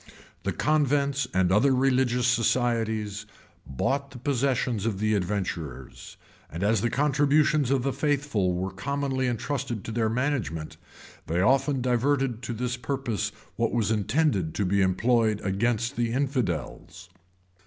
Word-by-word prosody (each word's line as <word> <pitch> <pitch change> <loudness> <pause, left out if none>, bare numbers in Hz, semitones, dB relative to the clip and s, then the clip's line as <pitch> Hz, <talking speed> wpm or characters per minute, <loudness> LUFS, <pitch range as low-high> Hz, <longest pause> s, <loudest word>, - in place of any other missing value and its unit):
The - - -2
convents 140 -3 +1
and 90 -3 +2
other 130 +7 +4
religious 125 -2 +2
societies 115 -3 0 0.4
bought 135 - -1
the 130 - -11
possessions 125 -4 0
of 105 -4 -1
the 110 +1 +1
adventurers; 90 - -4 0.3
and 85 +4 -4
as 105 0 +2
the 120 - +1
contributions 145 +1 +2
of 135 -2 +1
the 135 0 0
faithful 140 -9 0
were 95 +2 -2
commonly 135 +5 -2
intrusted 120 -2 -3
to - - -6
their 110 -1 0
management, 115 - -2 0.5
they 85 +2 0
often 135 +4 +2
diverted 130 -1 +1
to 120 -1 -4
this 125 +1 -2
purpose 125 -4 -2 0.3
what - - 0
was 110 -2 +1
intended 105 - +1
to 105 - 0
be 100 +2 +2
employed 110 +3 +2
against 115 +6 0
the 120 -1 0
infidels. 100 - -3
120 Hz, 135 wpm, -26 LUFS, 105-135 Hz, 0.5 s, other